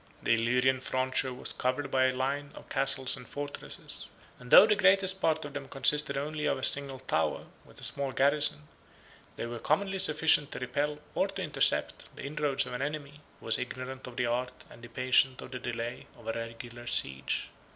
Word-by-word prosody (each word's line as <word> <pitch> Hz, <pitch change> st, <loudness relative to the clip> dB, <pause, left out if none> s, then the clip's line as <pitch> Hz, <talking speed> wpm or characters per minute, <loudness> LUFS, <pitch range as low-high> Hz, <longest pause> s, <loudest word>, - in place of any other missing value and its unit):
The -, -, +3 dB
Illyrian 125 Hz, +3 st, +2 dB
frontier 130 Hz, 0 st, -1 dB
was 125 Hz, -, -2 dB
covered 130 Hz, +3 st, -2 dB
by 130 Hz, -1 st, +3 dB
a 130 Hz, 0 st, +1 dB
line 140 Hz, +2 st, -2 dB
of -, -, -13 dB
castles 135 Hz, -1 st, +3 dB
and 125 Hz, -3 st, -12 dB
fortresses; 145 Hz, 0 st, -5 dB, 0.3 s
and 125 Hz, 0 st, -12 dB
though 200 Hz, -, +10 dB
the 215 Hz, -1 st, +3 dB
greatest 190 Hz, -1 st, +4 dB
part 160 Hz, -1 st, +1 dB
of 145 Hz, -, -8 dB
them 145 Hz, -2 st, -6 dB
consisted 150 Hz, +2 st, +3 dB
only 150 Hz, +2 st, -2 dB
of -, -, +1 dB
a 130 Hz, -, -8 dB
single 140 Hz, -1 st, +1 dB
tower, 80 Hz, -, -1 dB, 0.2 s
with -, -, -16 dB
a -, -, -11 dB
small 140 Hz, -1 st, -2 dB
garrison, 135 Hz, -, +2 dB, 0.7 s
they -, -, -4 dB
were 120 Hz, 0 st, -6 dB
commonly 190 Hz, -, 0 dB
sufficient 155 Hz, -3 st, +3 dB
to -, -, -5 dB
repel, 145 Hz, +3 st, -2 dB, 0.2 s
or -, -, +1 dB
to 195 Hz, -1 st, -5 dB
intercept, 155 Hz, -, +1 dB
the -, -, -9 dB
inroads 140 Hz, -1 st, 0 dB
of -, -, -7 dB
an 125 Hz, -, -4 dB
enemy, 145 Hz, 0 st, -5 dB, 0.2 s
who -, -, -16 dB
was 115 Hz, -, +2 dB
ignorant 130 Hz, +1 st, -6 dB
of 125 Hz, -, -10 dB
the -, -, +1 dB
art, 125 Hz, +1 st, -3 dB
and 120 Hz, -, -14 dB
impatient 125 Hz, +2 st, +2 dB
of -, -, -9 dB
the 125 Hz, -, -5 dB
delay, 120 Hz, +1 st, -5 dB
of -, -, -16 dB
a 115 Hz, -, -2 dB
regular 115 Hz, +1 st, -8 dB
siege. 65 Hz, -, 0 dB
130 Hz, 195 wpm, -30 LUFS, 125-145 Hz, 0.7 s, though